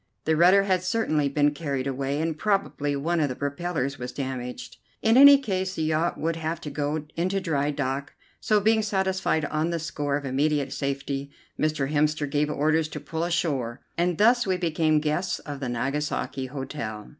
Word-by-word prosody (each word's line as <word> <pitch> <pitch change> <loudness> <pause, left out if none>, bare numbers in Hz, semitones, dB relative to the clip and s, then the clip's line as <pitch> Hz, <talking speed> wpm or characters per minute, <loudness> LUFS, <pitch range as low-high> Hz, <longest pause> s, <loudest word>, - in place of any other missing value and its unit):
The 160 - +2
rudder 180 +5 +6
had 185 -2 +1
certainly 185 -7 0
been 145 +1 +2
carried 140 -3 -3
away, 135 +1 -2
and 160 0 -1
probably 150 -7 0
one 165 +5 0
of 150 -2 +1
the 130 - -4
propellers 140 -1 -3
was 125 0 -5
damaged. 130 -2 -5 0.3
In 225 +1 +4
any 280 +2 +10
case 190 -7 -2
the 160 - -1
yacht 160 +2 0
would 165 +1 -1
have 160 0 -3
to 150 - -6
go 150 +1 -2
into 185 +4 0
dry 150 -6 0
dock; 140 -1 -3 0.3
so, 215 -1 +2
being 220 +2 +3
satisfied 190 -6 0
on 155 +2 -1
the 170 - -1
score 145 -3 -2
of 145 - -7
immediate 140 +1 0
safety, 140 0 -3 0.3
Mr. 150 -3 0
Hemster 150 0 +1
gave 150 +1 0
orders 155 +2 +1
to 150 -1 -7
pull 160 +3 -4
ashore, 145 -9 -1 0.2
and 175 0 0
thus 235 +3 +4
we 185 -1 +1
became 160 -3 +2
guests 165 +4 -1
of 145 -2 -7
the 130 -3 -3
Nagasaki 135 +1 -2
Hotel. 125 -5 -6
150 Hz, 180 wpm, -26 LUFS, 140-175 Hz, 0.3 s, any